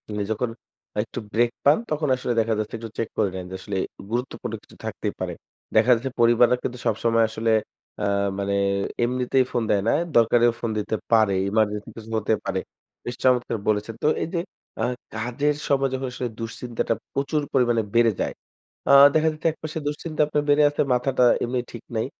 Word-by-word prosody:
মানে 105 Hz, -, -1 dB
যখন 115 Hz, +2 st, -1 dB, 0.5 s
একটু 115 Hz, -, -7 dB
ব্রেক 120 Hz, +2 st, +3 dB
পান, 145 Hz, +2 st, +6 dB
তখন 150 Hz, 0 st, 0 dB
আসলে 125 Hz, -1 st, -2 dB
দেখা 110 Hz, 0 st, +2 dB
যাচ্ছে 110 Hz, +1 st, -3 dB
একটু 115 Hz, 0 st, -7 dB
চেক 115 Hz, -, -2 dB
করে 100 Hz, -, +2 dB
নেন 90 Hz, -1 st, -5 dB
যে -, -, -4 dB
আসলে, 100 Hz, 0 st, -4 dB, 0.3 s
গুরুত্বপূর্ণ 125 Hz, +2 st, -3 dB
কিছু -, -, -18 dB
থাকতেই -, -, -3 dB
পারে। -, -, -3 dB, 0.4 s
দেখা 125 Hz, -, +5 dB
যাচ্ছে 130 Hz, +3 st, -4 dB
পরিবাররা 120 Hz, +1 st, +5 dB
কিন্তু 125 Hz, -, -3 dB
সবসময় 115 Hz, +1 st, +2 dB
আসলে 110 Hz, +1 st, 0 dB, 0.5 s
আ -, -, +2 dB, 0.3 s
মানে, 100 Hz, 0 st, 0 dB, 0.5 s
এমনিতেই 125 Hz, +1 st, +2 dB
ফোন 120 Hz, -2 st, 0 dB
দেয় 100 Hz, -, +3 dB
না। -, -, +4 dB, 0.2 s
দরকারেও 120 Hz, +1 st, +5 dB
ফোন 115 Hz, -, -1 dB
দিতে 110 Hz, +1 st, -2 dB, 0.2 s
পারে। 110 Hz, -3 st, +5 dB, 0.2 s
এমার্জেন্সি 105 Hz, 0 st, 0 dB
কিছু 115 Hz, 0 st, -9 dB
হতে 110 Hz, +1 st, +1 dB
পারে। -, -, -1 dB, 0.5 s
বেশ 120 Hz, -, -4 dB
চমৎকার 125 Hz, -3 st, +2 dB
বলেছেন। 105 Hz, +1 st, 0 dB
তো -, -, +4 dB, 0.2 s
এই -, -, -3 dB
যে 170 Hz, -, +1 dB, 0.4 s
আ -, -, +1 dB, 0.3 s
কাজের 125 Hz, +6 st, 0 dB
সময় 135 Hz, -1 st, +2 dB
যখন 130 Hz, 0 st, -2 dB
আসলে 125 Hz, -1 st, -3 dB
দুশ্চিন্তাটা 115 Hz, 0 st, -2 dB, 0.2 s
প্রচুর 140 Hz, +2 st, 0 dB
পরিমাণে 120 Hz, -4 st, +3 dB
বেড়ে 115 Hz, -1 st, +5 dB
যায়। -, -, -1 dB, 0.6 s
আ -, -, +6 dB, 0.2 s
দেখা 160 Hz, 0 st, +3 dB
যাচ্ছে 155 Hz, +2 st, -2 dB
একপাশে 155 Hz, 0 st, -7 dB
দুশ্চিন্তা 155 Hz, +1 st, -2 dB
আপনার 150 Hz, -1 st, 0 dB
বেড়ে 145 Hz, +1 st, +5 dB
আছে, 145 Hz, -, -1 dB
মাথাটা 125 Hz, 0 st, +2 dB, 0.2 s
এমনি 125 Hz, +1 st, -1 dB
ঠিক 120 Hz, -, -9 dB
নাই। 110 Hz, -, 0 dB
120 Hz, 180 wpm, -24 LUFS, 110-135 Hz, 0.6 s, পান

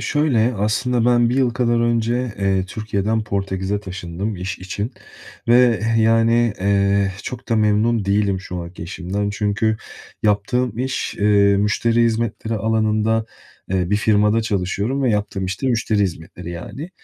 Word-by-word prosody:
şöyle. 130 Hz, -6 st, +1 dB
Aslında 110 Hz, +4 st, 0 dB
ben 120 Hz, -1 st, +4 dB
1 125 Hz, -, 0 dB
yıl 130 Hz, -2 st, +3 dB
kadar 120 Hz, -1 st, +1 dB
önce, 120 Hz, +1 st, 0 dB
eee, 95 Hz, -1 st, +1 dB
Türkiye'den 110 Hz, +1 st, -2 dB
Portekiz'e 100 Hz, 0 st, -2 dB
taşındım 95 Hz, +1 st, -5 dB
iş 90 Hz, +1 st, -5 dB
için 100 Hz, +5 st, -4 dB, 0.6 s
ve, 120 Hz, -2 st, +5 dB
eee, 115 Hz, 0 st, +2 dB
yani, 115 Hz, +1 st, +3 dB
eee, 100 Hz, 0 st, +2 dB
çok 125 Hz, -1 st, -7 dB
da 115 Hz, -, +2 dB
memnun 110 Hz, +1 st, +2 dB
değilim 100 Hz, -1 st, +1 dB
şu 90 Hz, -1 st, -7 dB
anki 85 Hz, 0 st, -7 dB
işimden 95 Hz, +4 st, -3 dB
çünkü 105 Hz, +1 st, 0 dB, 0.5 s
yaptığım 110 Hz, +3 st, 0 dB
iş, 130 Hz, +1 st, -2 dB
ııı, 100 Hz, -1 st, +4 dB
müşteri 115 Hz, +3 st, +2 dB
hizmetleri 115 Hz, -1 st, -1 dB
alanında, 110 Hz, +1 st, +1 dB, 0.4 s
eee, 95 Hz, -1 st, 0 dB
bir 105 Hz, -, +3 dB
firmada 105 Hz, +1 st, +3 dB
çalışıyorum 105 Hz, +5 st, -1 dB
ve 130 Hz, -, +2 dB
yaptığım 105 Hz, -2 st, -1 dB
iş 95 Hz, +1 st, -4 dB
de -, -, 0 dB
müşteri 115 Hz, -3 st, 0 dB
hizmetleri, 85 Hz, -2 st, -4 dB
yani. 130 Hz, -, -7 dB
105 Hz, 150 wpm, -20 LUFS, 100-115 Hz, 0.6 s, ve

